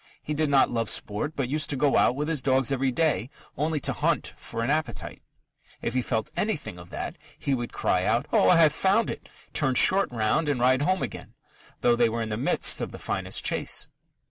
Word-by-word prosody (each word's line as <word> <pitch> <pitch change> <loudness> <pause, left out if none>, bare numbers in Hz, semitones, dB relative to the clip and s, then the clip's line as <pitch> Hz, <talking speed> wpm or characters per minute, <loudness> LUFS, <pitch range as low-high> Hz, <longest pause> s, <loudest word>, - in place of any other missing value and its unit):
He 150 - -3
did 155 0 0
not 140 -1 +4
love 115 -2 -1
sport, 105 +9 -1
but 135 -3 -1
used 150 +2 0
to 145 - -1
go 140 +1 +2
out 125 - +3
with 150 +2 -2
his 160 -4 -1
dogs 135 0 +2
every 135 -1 +1
day 130 - 0 0.3
only 155 +2 -1
to - - 0
hunt - - -1
for 115 - -5
an 125 - 0
appetite. 155 +1 -3 0.6
If 115 - -3
he 130 - +1
felt 110 -3 -2
anything 175 - -3
of 85 0 -12
that, - - -6 0.2
he 140 - -2
would 120 -2 -3
cry 90 0 0
out, 115 +6 +1
"Oh, - - +5
I 180 - +6
have 155 -3 +5
found 200 +7 +2
it!" - - -9 0.2
turn 135 -5 +1
short 195 +7 +4
round 115 +7 0
and 140 -4 0
ride 130 +2 +3
home 185 +2 +1
again, 120 - -7 0.5
though 120 -1 +4
they 120 -1 +3
were 115 +1 -2
in 110 - -5
the 105 - -2
midst 125 +6 +2
of - - -4
the - - -9
finest - - -2
chase. - - 0
135 Hz, 220 wpm, -26 LUFS, 115-150 Hz, 0.6 s, I